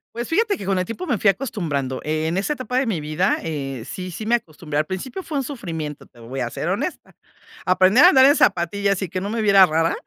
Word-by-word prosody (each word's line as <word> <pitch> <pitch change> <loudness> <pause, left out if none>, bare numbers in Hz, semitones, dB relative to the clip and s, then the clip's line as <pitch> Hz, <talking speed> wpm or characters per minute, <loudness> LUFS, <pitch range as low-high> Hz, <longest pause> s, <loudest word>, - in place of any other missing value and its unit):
Pues 240 +1 -4
fíjate 410 +3 +1
que - - -8
con 190 -1 +1
el 185 - -1
tiempo 230 - -6
me 245 - 0
fui 200 - +3
acostumbrando. 155 - -2
Eh, 155 +1 -1
en 170 +3 -1
esa 200 +9 0
etapa 255 -2 -4
de 265 - +2
mi 180 -8 -1
vida, 155 +6 0
eh, 135 -6 -4
sí 185 +6 -6
sí 215 +6 -7
me 235 +2 +3
acostumbré, 155 -8 -5
al 155 - +1
principio 190 - -5
fue 315 -5 -5
un 270 - 0
sufrimiento, 165 - -6
te 120 - -22
voy 120 +4 -7
a 120 -2 -2
ser - - -4
honesta. - - -4 0.5
Aprender 185 +7 +5
a - - +9
andar 265 -6 +6
en 285 +2 +6
zapatillas 195 - +1
y 190 - -3
que 185 - -3
no 200 - -3
me 225 +1 -2
viera 200 -3 +7
rara, 165 0 +1
190 Hz, 250 wpm, -22 LUFS, 155-235 Hz, 0.5 s, a